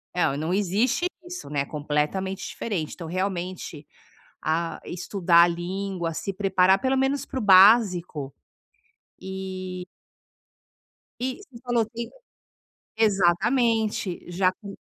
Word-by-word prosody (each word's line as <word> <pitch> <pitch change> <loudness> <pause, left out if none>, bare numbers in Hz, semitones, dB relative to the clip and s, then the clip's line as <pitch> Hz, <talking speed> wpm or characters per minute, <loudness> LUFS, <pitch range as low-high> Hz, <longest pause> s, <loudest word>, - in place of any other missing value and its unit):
eh, 180 - 0
ah, 140 - +1
não 160 +4 -2
existe 210 - +1 0.2
isso, 355 - -8
né, 145 -2 0
é - - -2
completamente 150 +7 -2
diferente. 180 -9 -4
Então 170 -3 -8
realmente, 180 -4 -4 0.6
ah, 165 +2 -1
estudar 175 -1 +3
a - - +2
língua, 175 0 -3
se 195 - -3
preparar 190 -1 +3
pelo 265 0 +1
menos 270 +1 0
para 265 - -4
o - - -3
básico 185 - +5 0.9
e 185 -1 -6 1.3
I 255 +1 -2
você 255 -11 -14
falou 240 -2 +1
que 235 +1 -6 0.9
exatamente. 215 0 +1
Já 185 +1 +2
que 200 +1 -11
190 Hz, 120 wpm, -25 LUFS, 175-215 Hz, 1.3 s, básico